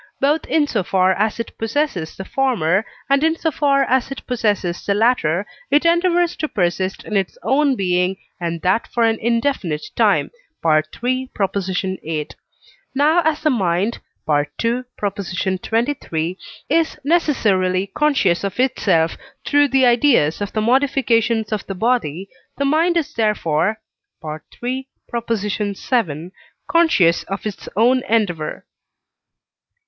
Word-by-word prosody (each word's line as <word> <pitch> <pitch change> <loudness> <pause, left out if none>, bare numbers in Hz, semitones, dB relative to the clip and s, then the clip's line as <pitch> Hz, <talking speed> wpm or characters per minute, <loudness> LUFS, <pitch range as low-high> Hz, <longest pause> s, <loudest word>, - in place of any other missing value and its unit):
both 295 +3 +2
in 310 -2 +2
so 225 -7 -1
far 185 +1 +2
as 215 +3 -1
it 230 - -5
possesses 225 - -1
the 190 - -6
former, 210 -9 +1 0.2
and 275 +1 +3
in 320 0 +3
so 325 -1 -1
far 280 -1 +2
as 260 -1 +1
it 275 - -7
possesses 205 -8 -1
the 200 - 0
latter, 205 -6 +2 0.2
it 290 +4 +3
endeavours 345 0 +3
to 310 - -2
persist 185 -3 -1
in 215 - -5
its 195 -2 -1
own 280 0 +2
being, 180 -2 0 0.2
and 170 -1 -3
that 185 +5 +1
for 235 - 0
an 225 -1 +2
indefinite 230 - 0
time - - +2 0.3
(III. 235 +12 0
viii.). 185 -5 -2 0.7
Now 305 +5 +4
as 315 -1 0
the 305 - +3
mind 195 -1 0 0.3
(II. 150 +12 0 0.2
xxiii.) 190 - -2 0.3
is 325 +2 +1
necessarily 205 - +2
conscious 205 -9 +1
of 200 +3 -4
itself 185 -10 +2 0.3
through 290 0 +4
the 265 -1 +3
ideas 235 - +3
of 205 - -3
the 215 - -1
modifications 235 -3 +2
of 215 -2 -3
the 195 - -4
body, 195 - 0 0.3
the 280 - 0
mind 330 +5 +2
is 300 -3 -1
therefore 210 -2 0 0.5
(III. 240 - -5 0.3
vii.) 205 - -2 0.4
conscious 305 - +3
of 195 +2 -5
its 200 -4 -5
own 245 +5 +4
endeavour. 180 -9 -1
220 Hz, 130 wpm, -20 LUFS, 185-270 Hz, 0.7 s, Now